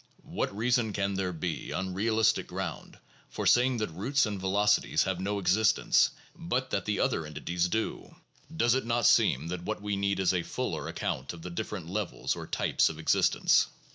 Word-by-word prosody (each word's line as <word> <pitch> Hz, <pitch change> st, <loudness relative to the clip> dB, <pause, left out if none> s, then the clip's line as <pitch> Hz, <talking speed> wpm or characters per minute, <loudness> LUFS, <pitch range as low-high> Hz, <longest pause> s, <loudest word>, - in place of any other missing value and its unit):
7 -, -, -15 dB
"What 100 Hz, -, -2 dB
reason 120 Hz, -1 st, +1 dB
can 100 Hz, 0 st, -1 dB
there 95 Hz, -1 st, -1 dB
be, 85 Hz, 0 st, -4 dB
on 95 Hz, 0 st, -3 dB
realistic 110 Hz, +3 st, +1 dB
ground, -, -, -6 dB, 0.3 s
for -, -, -5 dB
saying 125 Hz, +1 st, +4 dB
that 105 Hz, -6 st, -2 dB
roots 125 Hz, -, +1 dB
and 105 Hz, -2 st, -4 dB
velocities 105 Hz, +2 st, +2 dB
have 95 Hz, -2 st, -2 dB
no 100 Hz, +2 st, -2 dB
existence, 100 Hz, +3 st, +3 dB, 0.3 s
but -, -, -2 dB
that -, -, -1 dB
the -, -, -1 dB
other -, -, +1 dB
entities 85 Hz, +3 st, -2 dB
do? 110 Hz, +5 st, -3 dB, 0.4 s
Does 120 Hz, -5 st, +3 dB
it 130 Hz, -, +1 dB
not 120 Hz, 0 st, +1 dB
seem 75 Hz, +6 st, +4 dB
that 90 Hz, 0 st, -4 dB
what 110 Hz, +5 st, -4 dB
we 105 Hz, -1 st, -1 dB
need 100 Hz, 0 st, 0 dB
is 95 Hz, -1 st, +2 dB
a 90 Hz, -, +1 dB
fuller -, -, -4 dB
account 65 Hz, +3 st, -3 dB
of 85 Hz, -1 st, -11 dB
the 90 Hz, -, -6 dB
different 95 Hz, -2 st, -5 dB
levels 100 Hz, +1 st, -2 dB
or -, -, -7 dB
types -, -, +1 dB
of 80 Hz, -, -7 dB
existence? 80 Hz, -, +3 dB
100 Hz, 190 wpm, -29 LUFS, 90-110 Hz, 0.4 s, saying